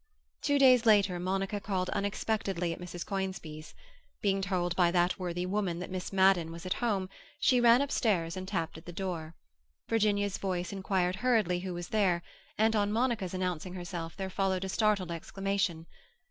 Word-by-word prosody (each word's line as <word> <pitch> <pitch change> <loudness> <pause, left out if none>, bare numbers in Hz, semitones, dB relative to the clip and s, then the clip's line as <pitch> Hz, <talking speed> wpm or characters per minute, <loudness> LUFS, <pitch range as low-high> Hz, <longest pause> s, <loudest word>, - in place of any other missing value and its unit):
Two 285 - +2
days 255 -4 +6
later 200 -4 +4
Monica 195 +3 -1
called 190 -2 -2
unexpectedly 200 -4 -1
at - - -9
Mrs. 175 -1 -6
Conisbee's. 190 -6 -5 0.4
Being 195 -1 +1
told 180 -2 -1
by 180 -2 +4
that 175 +1 +1
worthy 175 -1 -2
woman 185 -2 -1
that 180 +1 -6
Miss 185 -1 -4
Madden 190 -4 +4
was 165 +1 -9
at 185 - 0
home, 200 -6 0 0.3
she 255 -3 +4
ran 240 +3 +6
upstairs 195 -11 0
and 185 0 -5
tapped 165 -5 -3
at 160 - -19
the - - -5
door. 170 -4 -4 0.5
Virginia's 205 -3 +1
voice 180 -1 -2
inquired 190 -2 0
hurriedly 215 -7 +2
who 180 -1 -5
was 175 0 -6
there, 185 -5 +2 0.3
and 220 +1 +3
on 205 -1 +2
Monica's 225 -5 0
announcing 180 -1 -3
herself 175 -2 -5
there 190 -1 -4
followed 190 -1 0
a 190 - -3
startled 200 -4 +1
exclamation. 190 -1 -2
190 Hz, 170 wpm, -30 LUFS, 175-205 Hz, 0.5 s, days